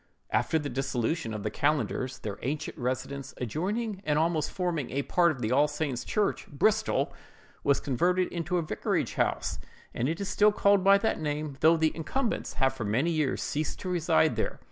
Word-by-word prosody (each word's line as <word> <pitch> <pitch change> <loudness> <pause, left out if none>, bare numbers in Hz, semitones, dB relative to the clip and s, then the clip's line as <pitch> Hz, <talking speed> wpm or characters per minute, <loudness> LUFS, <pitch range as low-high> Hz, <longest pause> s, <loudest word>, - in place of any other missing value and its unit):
After 160 - +2
the 150 -2 -2
dissolution 135 -1 -1
of 105 -2 -5
the - - -2
Calendars, 135 -3 0
their 100 -2 -6
ancient 145 +4 -3
residence, 130 +2 -4
adjoining 195 - -2
and 150 -3 +1
almost 160 -1 +1
forming 170 -8 -2
a 140 +2 -1
part 175 +3 +3
of 120 -6 -3
All 145 +3 +4
Saint's 150 -4 -3
church, 210 -1 -1
Bristol, 215 +10 +1 0.5
was 140 -1 +3
converted 180 +7 +1
into 175 +1 -2
a 170 - 0
vicarage 155 - -1
house, - - -1 0.3
and 125 +4 0
it 165 - -2
is 200 - -3
still 210 +1 +4
called 200 -2 +3
by 195 +1 +7
that 200 -4 -1
name, 150 -1 -2
though 165 +1 +5
the 160 -1 +1
incumbents 230 - -2
have 135 0 +2
for 130 -4 -5
many 120 +11 +1
years 155 -5 0
ceased 155 +1 -2
to 185 - -4
reside 165 - +2
there. - - -2
155 Hz, 185 wpm, -28 LUFS, 135-180 Hz, 0.5 s, by